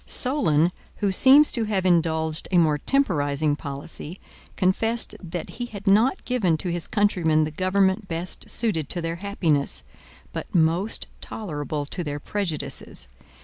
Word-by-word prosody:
Solon, 180 - +2 0.2
who 200 -2 0
seems 270 +9 +7
to 230 -2 +1
have 195 -3 -1
indulged 160 -3 +1
a 185 - +2
more 155 -3 +3
temporizing 150 - +1
policy, 145 +4 -6 0.4
confessed 225 +5 0
that 175 -2 -6
he 240 - -2
had 200 -4 -9
not 220 - +3
given 200 -11 +1
to 175 +3 -3
his 170 -1 -1
countrymen 175 -7 +2
the 155 - -3
government 190 +4 +1
best 170 +1 -3
suited 175 - 0
to 175 - 0
their 165 0 -3
happiness, 170 -7 0 0.5
but - - -6
most 170 +5 +1 0.2
tolerable 150 -7 -4
to 175 +5 -5
their 145 -2 -4
prejudices. 170 -2 -2
175 Hz, 145 wpm, -24 LUFS, 155-205 Hz, 0.5 s, seems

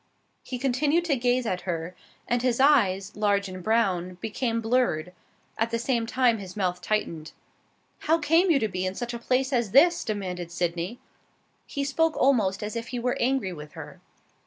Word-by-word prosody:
He 255 - -5
continued 285 +6 +1
to 305 -5 +2
gaze 245 0 +1
at 185 -5 -2
her, 175 -1 -4 0.3
and 240 0 +1
his 250 -1 +1
eyes, 200 -9 +3
large 205 -1 +1
and 185 -1 -7
brown, 185 -4 +1
became 230 +3 -2
blurred; 225 -8 0 0.5
at 225 +1 +1
the 230 - -1
same 235 -1 -1
time 240 -2 +2
his 190 0 -9
mouth 180 -2 -1
tightened. 170 -6 -2 0.7
"How 325 +2 +2
came 330 +4 +3
you 320 - +5
to 225 -5 0
be 185 -2 -3
in 185 0 -2
such 240 +1 -4
a 235 - -5
place 260 +3 0
as 235 -5 0
this?" 340 +6 +5
demanded 180 -5 -4
Sydney. 175 +5 -2 0.7
He 280 - -3
spoke 315 +3 +1
almost 215 -8 +2
as 210 +2 -4
if 230 0 -4
he 250 - -4
were 245 +1 0
angry 250 -7 0
with 150 -2 -10
her. - - -10
230 Hz, 185 wpm, -26 LUFS, 185-255 Hz, 0.7 s, you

